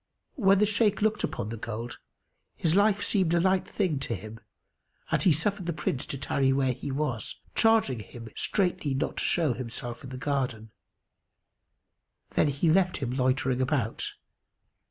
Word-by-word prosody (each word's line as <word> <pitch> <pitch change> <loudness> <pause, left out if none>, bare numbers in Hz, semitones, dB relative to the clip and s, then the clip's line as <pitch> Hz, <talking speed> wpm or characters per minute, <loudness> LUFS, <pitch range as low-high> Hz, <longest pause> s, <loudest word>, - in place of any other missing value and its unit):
When 200 - +4
the 210 - +4
Shaykh 205 -1 +2
looked 215 0 +1
upon 105 - -2
the 115 - -5
gold, 115 +2 -6 0.6
his 160 - +1
life 205 +1 +3
seemed 185 -5 +2
a - - +4
light 190 +1 +2
thing 180 -9 0
to 125 -3 -2
him[FN#283] 110 +1 -10 0.7
and - - +2
he 185 - +5
suffered 185 +4 0
the 170 - 0
Prince 145 -3 -2
to 140 - -4
tarry 135 0 +1
where 135 -1 +2
he 140 - -6
was, 135 -5 -3
charging 225 - +3
him 115 +2 -10
straitly 175 -8 0
not 135 - -2
to - - +1
show 160 -7 +2
himself 120 0 -6
in 130 - -8
the 130 - -6
garden. 125 -6 -2 1.6
Then - - +3
he 145 +3 +2
left 185 +1 +3
him 130 -4 -3
loitering 130 0 +1
about. 130 -4 -1
140 Hz, 165 wpm, -28 LUFS, 125-190 Hz, 1.6 s, he